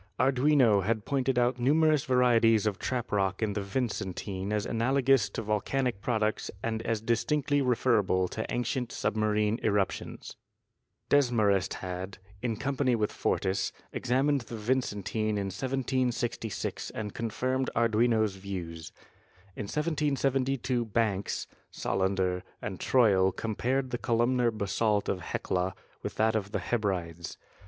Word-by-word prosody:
Arduino 130 -5 +4
had 110 +1 -1
pointed 135 -2 0
out 125 +1 +2
numerous 150 +3 +3
varieties 115 -4 +4
of 105 -3 -1
trap 125 -2 -2
rock 95 0 0
in 105 -2 0
the 100 - -2
Vicen 100 -3 -2
tine 95 0 -4
as 105 -1 0
analogous 130 -1 +2
to 115 - -5
volcanic 110 +2 -1
products 110 -3 0
and 110 -1 -1
as 115 -1 -1
distinctly 145 +5 +1
referable 115 -7 +2
to 110 - -3
ancient 125 0 -1
submarine 105 +1 0
eruptions. 100 -3 -2 0.7
Desmarest 110 -9 +3
had, 90 +1 -5 0.2
in 115 -2 -1
company 135 -1 +1
with 105 -2 0
Fortis, 95 +1 0 0.2
examined 135 +3 +1
the 115 0 -8
Vicentine 110 -2 -1
in 100 -2 -2
1766 125 -1 -2
and 105 -2 -5
confirmed 130 +3 -1
Arduino's 110 -2 +2
views. 90 -4 -6 0.6
In - - -4
1772 135 -3 0
Banks, 105 -3 -1 0.2
Solander 95 -1 0 0.2
and 95 -3 -5
Troil 100 -7 +4
compared 125 +6 -1
the 120 - -2
columnar 120 +1 +2
basalt 105 0 0
of 95 - -1
Hecla 90 +1 -2 0.3
with - - -5
that 110 0 +2
of 100 -1 -2
the - - 0
Hebrides. 90 -7 -2
115 Hz, 125 wpm, -29 LUFS, 100-130 Hz, 0.7 s, Arduino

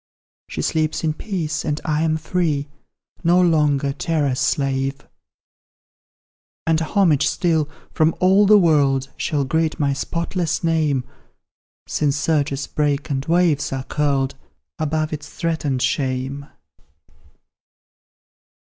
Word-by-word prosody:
She - - -4
sleeps 155 0 0
in 155 -1 +1
peace, 155 -5 -3
and 150 0 -2
I 155 0 0
am 160 -1 +1
free, 155 -3 -1 0.6
No 175 +1 +4
longer 150 -5 +2
terror's 150 -5 -1
slave: 135 0 -1 1.6
And 160 -1 +2
homage 165 -3 +2
still, 160 -4 +1 0.2
from 160 +1 +2
all 190 +2 +5
the 210 +1 +8
world, 140 -7 +3
Shall 150 -4 -1
greet 160 +3 0
my 140 -2 +2
spotless 170 +3 -2
name, 155 -5 +1 0.8
Since 145 -1 0
surges 145 -2 0
break 145 -1 -1
and 135 -1 -1
waves 170 -3 +2
are 135 -1 -3
curled 140 -2 0 0.5
Above 155 0 -1
its 150 -1 -6
threatened 155 -6 -2
shame." 135 +1 -2
150 Hz, 110 wpm, -21 LUFS, 140-165 Hz, 1.6 s, the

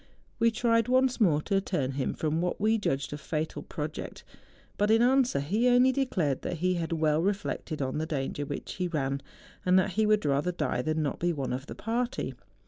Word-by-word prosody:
We 230 0 +5
tried 230 0 +2
once 255 0 +2
more 155 -7 +4
to 195 -1 +1
turn 145 -9 -1
him 135 -1 -2
from 160 +1 -1
what 180 0 -1
we 220 +2 +2
judged 140 -7 -1
a 145 - -5
fatal 155 +1 -3
pro¬ 150 0 -4
ject; - - -8 0.5
but 205 +1 +1
in 225 +1 +5
answer 255 - +3
he 205 - +1
only 250 +1 +5
declared 185 - 0
that 175 - -3
he 185 +3 +1
had 170 -2 -3
well 155 -1 +2
reflected 190 -5 -2
on 130 +3 -2
the 160 - -2
danger 145 -1 -2
which 145 0 -5
he 180 -1 0
ran, 140 -4 -2 0.4
and 185 0 +4
that 190 +1 +2
he 215 +4 +1
would 210 -5 +3
rather 145 +5 +1
die 150 -7 -1
than 155 +3 0
not 145 - -2
be 175 0 +1
one 135 -6 -3
of 135 +2 -5
the - - -7
party. 235 - -2
175 Hz, 215 wpm, -29 LUFS, 145-220 Hz, 0.5 s, We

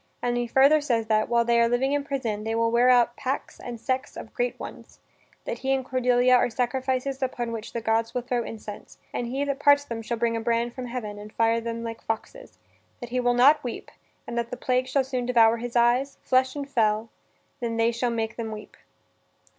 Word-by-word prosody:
And 240 0 -1
he 240 0 -1
further 275 +5 +5
says 235 -6 0
that, 215 0 +2
while 235 0 +3
they 235 0 +3
are 230 - +3
living 260 +3 +1
in 290 0 0
prison, 235 -7 -3
they 225 +1 -2
will 230 0 +1
wear 240 +2 +4
out 240 -1 +4
"packs 265 +1 -4
and 240 -2 -7
sects 260 +2 -3
of - - -9
great - - -2
ones"; - - -10 0.5
that - - -4
he 270 - -1
and 265 -1 -1
Cordelia 250 -1 +3
are 250 - +4
sacrifices 260 +2 -1
upon 245 -2 -2
which 225 -1 -6
the 235 - -4
gods 225 +1 +1
will 250 - -1
throw 245 -1 -1
incense, 210 -2 -9 0.2
and 240 - -2
that - - -6
he 270 +3 -1
that 280 -1 -2
parts 285 0 +5
them 230 -4 -5
"shall 235 +1 -3
bring 230 0 0
a 225 - -2
brand 235 +1 0
from 255 -1 -6
heaven 215 -4 -5
and 210 +1 -10
fire 230 +1 +2
them 230 0 -4
like 230 -1 -6
foxes; - - -6 0.4
that 240 - -7
he 250 +1 -1
will 245 0 +2
not 290 +5 +5
weep, 245 - -6 0.3
and 235 - -6
that 235 0 -3
the 250 - -6
plague 255 0 0
shall 265 +1 +1
sooner 255 -2 -3
devour 230 -2 +5
his 240 +1 -6
eyes, 245 +4 +2
flesh 260 +1 +2
and 285 -1 -4
fell, 225 -4 +1 0.5
than 230 -2 -3
they 230 +1 +3
shall 235 +1 -1
make 225 -1 -3
them 225 -2 -4
weep." 215 -1 -9
240 Hz, 225 wpm, -26 LUFS, 230-260 Hz, 0.5 s, further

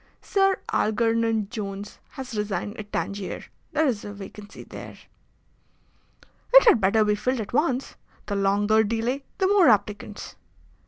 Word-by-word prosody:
Sir 390 -1 +2 0.2
Algernon 225 -1 +1
Jones 205 -3 -6
has 260 -3 -7
resigned 205 -1 -3
at 210 -1 -9
Tangier. 200 -1 -3 0.3
There 315 -1 +2
is 235 -7 0
a 205 - -6
vacancy 205 +1 -10
there." - - -10 1.6
"It - - +10
had 235 - +6
better 210 +3 +3
be 210 - +2
filled 250 +5 -1
at 210 0 -6
once. 270 -2 0 0.3
The 205 - -3
longer 205 +2 +3
delay 230 +5 -2
the 380 - +1
more 385 -5 +5
applicants." 210 -1 -1
220 Hz, 140 wpm, -25 LUFS, 205-255 Hz, 1.6 s, It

